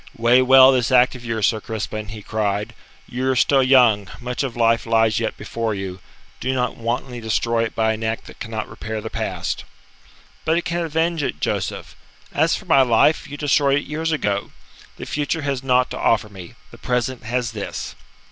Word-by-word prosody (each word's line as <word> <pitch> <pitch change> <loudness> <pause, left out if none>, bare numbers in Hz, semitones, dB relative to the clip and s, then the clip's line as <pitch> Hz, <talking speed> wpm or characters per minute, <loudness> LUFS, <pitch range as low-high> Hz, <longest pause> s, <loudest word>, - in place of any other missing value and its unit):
"Weigh 120 +2 +5
well 130 +1 +8
this 130 -1 +1
act 125 0 +5
of 125 -2 -10
yours, 115 -3 -1
Sir 110 -2 +1
Crispin," 110 -1 -5
he 105 0 -9
cried. 105 -1 -2 0.3
"You 130 +2 -2
are 130 - +2
still 135 +2 +4
young; 125 -6 +4
much 125 0 -3
of 135 -4 -3
life 115 0 +2
lies 115 -1 +3
yet 115 - -3
before 115 -2 -3
you. 95 -1 -6 0.4
Do 130 +1 -1
not 125 -1 -1
wantonly 120 +1 -3
destroy 115 +1 0
it 110 - -7
by 110 0 +2
an 110 +1 -6
act 110 0 -2
that - - -13
cannot 110 -1 -4
repair 110 0 -6
the 110 +1 -7
past." - - -3 0.8
"But 160 +1 +2
it 175 - -2
can 175 +1 -1
avenge 165 +1 0
it, 105 - -3
Joseph. - - -3 0.4
As 160 +3 +2
for 210 - -8
my 140 -6 +5
life, 125 +5 +3
you 145 - -7
destroyed 140 -1 +2
it 145 - -3
years 160 +2 -2
ago. 100 -10 -1 0.5
The - - -7
future 150 +1 -2
has 140 -3 -2
naught 125 -1 +2
to - - -5
offer 110 -2 +2
me; 95 -4 -11 0.2
the - - -14
present 125 0 -1
has 120 0 -1
this." 105 -3 -5
120 Hz, 195 wpm, -21 LUFS, 110-135 Hz, 0.8 s, well